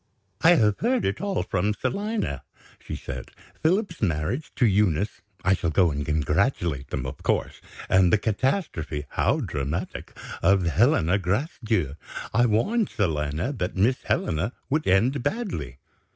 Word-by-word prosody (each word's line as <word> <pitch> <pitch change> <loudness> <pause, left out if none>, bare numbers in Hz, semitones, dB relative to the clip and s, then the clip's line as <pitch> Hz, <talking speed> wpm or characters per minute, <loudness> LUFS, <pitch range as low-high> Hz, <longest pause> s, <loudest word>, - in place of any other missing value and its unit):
"I 175 +2 +7
have 105 -8 +3
heard 245 +2 +1
it - - -1
all 200 -1 -1
from 100 +3 0
Selina," 210 - -2 0.4
she - - -6
said. - - -7 0.3
"Philip's 180 +2 +1
marriage 85 - -1
to 125 - +3
Eunice 100 -2 +1 0.2
(I 95 - +5
shall 85 -3 0
go 85 +1 +3
and 75 0 -2
congratulate 75 - 0
them, 65 - -3
of 65 - -6
course), - - -1 0.3
and 95 -2 +4
the - - +5
catastrophe 105 - -1
(how 140 +8 +1
dramatic!) 75 - -4 0.2
of 95 +1 +4
Helena 90 - +3
Gracedieu. 105 - -1 0.4
I 120 +1 +4
warned. 200 - +1
Selina 80 - -1
that 90 -8 -3
Miss 115 +7 +3
Helena 85 +10 -1 0.2
would 155 +2 +1
end 115 +9 +3
badly. 145 - -3
100 Hz, 140 wpm, -25 LUFS, -, 0.4 s, I